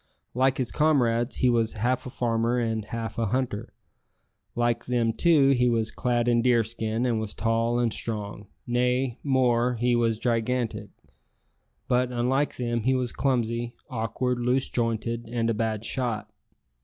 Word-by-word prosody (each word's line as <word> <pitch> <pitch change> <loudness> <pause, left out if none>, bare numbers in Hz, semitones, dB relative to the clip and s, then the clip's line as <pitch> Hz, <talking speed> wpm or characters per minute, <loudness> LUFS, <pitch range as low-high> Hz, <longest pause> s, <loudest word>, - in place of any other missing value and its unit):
Like 130 +1 +2
his 125 -3 -1
comrades, 125 -6 +2
he 125 - +2
was 115 -1 +1
half 125 +4 -1
a - - -5
farmer 120 -1 0
and 115 -3 -1
half 115 0 -5
a 115 - +1
hunter. 125 -2 -2 0.8
Like 120 0 0
them, 120 -2 +1
too, 150 0 +4
he 125 -2 +3
was 115 -1 0
clad 120 -1 0
in 120 -1 +3
deerskin, 115 -1 +1
and 115 -3 +1
was 110 -1 -4
tall 115 +1 +1
and 120 -2 +1
strong 105 -2 -4 0.2
nay, 125 +1 0
more, 125 -3 +2
he 120 +1 +1
was 115 -2 +1
gigantic. 115 -2 -1 1.0
But, 125 0 +1
unlike 130 +4 0
them, 120 -1 -1
he 130 +4 +2
was 125 -2 0
clumsy, 120 -3 -1 0.2
awkward, 125 +2 -1
loose 125 +2 +1
jointed, 115 0 -2
and 115 -1 0
a - - 0
bad 110 0 -2
shot. 115 -5 -2
120 Hz, 155 wpm, -26 LUFS, 115-125 Hz, 1.0 s, too